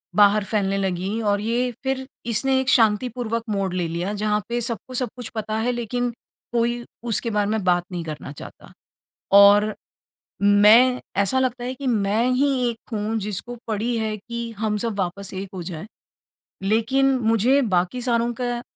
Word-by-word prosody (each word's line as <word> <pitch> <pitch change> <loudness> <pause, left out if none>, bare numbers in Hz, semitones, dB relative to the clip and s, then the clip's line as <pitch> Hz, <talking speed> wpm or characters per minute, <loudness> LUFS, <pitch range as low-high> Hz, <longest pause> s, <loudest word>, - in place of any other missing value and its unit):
बाहर 205 0 +5
फैलने 195 -2 0
लगी 190 +3 -2
और 205 -1 +1
ये 240 +3 0
फिर 265 0 -2 0.2
इसने 260 +4 +1
एक 260 -1 -1
शांतिपूर्वक 230 0 +2
मोड़ 195 -3 -1
ले 175 -2 -1
लिया 175 +5 -3
जहाँ 210 0 +1
पे 240 0 -1
सबको 235 +2 -4
सब 250 0 0
कुछ 245 -2 -6
पता 215 0 -2
है 245 +2 +1
लेकिन 245 +1 -2 0.4
कोई 240 0 0 0.3
उसके 230 +2 +1
बारे 210 -1 0
में 220 -3 -1
बात 175 -1 +2
नहीं 175 -2 -4
करना 150 -2 -7
चाहता। 145 - -12 0.7
और 205 +1 +7 0.7
मैं 215 +5 +6 0.2
ऐसा 260 +7 +1
लगता 250 -1 -1
है 255 +1 -3
कि 270 0 -6
मैं 215 0 +1
ही 280 +3 +2 0.2
एक 230 +2 -9
हूँ 215 +1 -2
जिसको 210 +4 -4
पड़ी 225 +2 -1
है 220 -1 -1
कि 235 +2 -6
हम 215 -1 0
सब 225 -3 -2
वापस 190 +2 -3
एक 190 0 -5
हो 180 - -5
जाए। 170 +1 -6 0.8
लेकिन 260 +7 +2
मुझे 230 +4 +3
बाकी 185 +3 0
सारों 235 -1 +1
का 245 -1 -2
220 Hz, 170 wpm, -23 LUFS, 200-245 Hz, 0.8 s, और